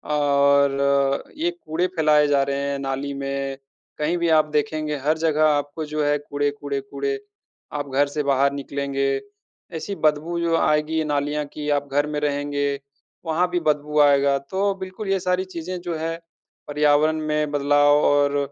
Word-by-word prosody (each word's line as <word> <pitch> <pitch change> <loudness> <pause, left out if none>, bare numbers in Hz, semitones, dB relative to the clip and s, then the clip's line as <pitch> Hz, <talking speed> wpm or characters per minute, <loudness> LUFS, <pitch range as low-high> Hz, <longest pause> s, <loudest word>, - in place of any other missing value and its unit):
और 140 -1 +3
ये 340 +3 0
कूड़े 180 - -2
फ़ैलाए 150 -2 +4
जा 140 -1 +3
रहे 140 0 -2
है। 140 - -2
नाली 135 +1 -3
में 135 0 -3 0.4
कहीं 160 +4 0
भी 170 -1 0
आप 155 - +2
देखेंगे 150 0 -1
हर 155 +1 +2
जगह 155 -1 +2
आपको 145 +1 -1
जो 150 0 -2
है 145 0 +2
कूड़े-कूड़े, 145 -1 -3
कूड़े। 415 - -3 0.5
आप 145 -1 -4
घर 140 +2 +2
से 145 +1 -3
बाहर 140 0 +2
निकलेंगे 140 0 -2 0.7
ऐसी 200 +5 -5
बदबू 155 +3 +1
जो 170 -1 +1
आएगी 155 +1 +1
नालियाँ 145 0 -1
की 150 -1 -4
आप 145 -1 0
घर 145 +1 +1
में 150 -1 -2
रहेंगे, 145 -1 -1 0.6
वहाँ 165 +3 +1
भी 175 0 0
बदबू 150 0 +1
आएगा। 140 -1 +4
तो 195 +1 +1
बिल्कुल 190 +2 -6
ये 195 -1 +2
सारी 180 +1 0
चीज़ें 180 0 -6
जो 175 -2 -4
है, 165 +1 -3 0.5
पर्यावरण 150 +1 +3
में 150 -1 0
बदलाव 145 0 +4
और 145 0 +3
145 Hz, 160 wpm, -23 LUFS, 140-160 Hz, 0.7 s, फ़ैलाए